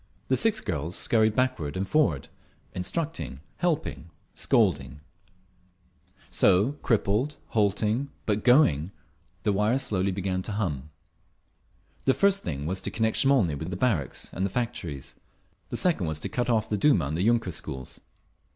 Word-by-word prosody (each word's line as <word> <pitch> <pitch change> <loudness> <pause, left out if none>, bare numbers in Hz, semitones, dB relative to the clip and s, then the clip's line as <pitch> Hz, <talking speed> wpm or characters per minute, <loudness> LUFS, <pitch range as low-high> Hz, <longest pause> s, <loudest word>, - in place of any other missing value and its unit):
The 130 - +4
six 220 +6 +3
girls 85 -2 -3
scurried 110 -2 +3
backward 125 - 0
and 95 +1 -2
forward, 140 - +1 0.5
instructing, 150 - -2 0.2
helping, 160 - -2 0.2
scolding…. 75 - +1 1.3
So, 100 +6 +4
crippled, 115 +5 +1
halting, 110 +5 +1 0.2
but 105 -1 0
going, 95 - +4 0.5
the 105 - +2
wires 110 +7 +1
slowly 95 -1 0
began 95 -1 -2
to 105 - -4
hum. 75 -9 -2 1.2
The 130 - +4
first 200 0 +3
thing 70 -2 -4
was 95 +3 -2
to - - -3
connect 110 0 0
Smolny 130 - +4
with 80 +4 -5
the 90 - -4
barracks 95 - -1
and 95 - -2
the 100 - +1
factories; 95 - -4 0.6
the - - -3
second, 110 - +1
to 75 - -4
cut 125 0 -1
off 110 -2 +2
the 105 - -1
Duma 100 - +4
and 75 +3 -3
the 85 - -1
yunker 115 -2 +2
schools…. 65 -3 -6
105 Hz, 145 wpm, -27 LUFS, 85-125 Hz, 1.3 s, The